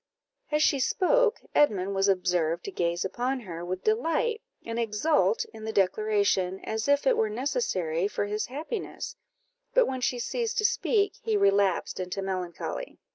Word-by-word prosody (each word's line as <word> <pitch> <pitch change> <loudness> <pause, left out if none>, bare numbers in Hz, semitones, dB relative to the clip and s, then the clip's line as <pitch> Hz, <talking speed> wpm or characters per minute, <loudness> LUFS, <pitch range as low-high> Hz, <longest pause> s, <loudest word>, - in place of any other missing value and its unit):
As 300 0 +3
she 280 - +3
spoke, 470 - +2
Edmund 200 -9 +3
was 195 0 +2
observed 180 -3 +1
to - - -4
gaze 170 -1 -1
upon 250 +6 -2
her 170 -5 -7
with 180 +1 -4
delight, 435 +1 +1 0.2
and 230 0 -3
exult 300 - +2
in 220 - -10
the 220 - -3
declaration, 200 -2 +1
as 220 +2 -3
if 285 0 +3
it 265 - +4
were 220 - +1
necessary 210 - -1
for 205 - -2
his 210 +1 -2
happiness; 315 - -5 0.6
but - - +6
when 260 -1 -3
she 245 0 0
ceased 465 - -2
to 430 - +2
speak, 405 -1 +1
he 220 -2 +1
relapsed 200 -3 +2
into 185 +2 -3
melancholy. 185 - -4
215 Hz, 160 wpm, -28 LUFS, 190-295 Hz, 0.6 s, but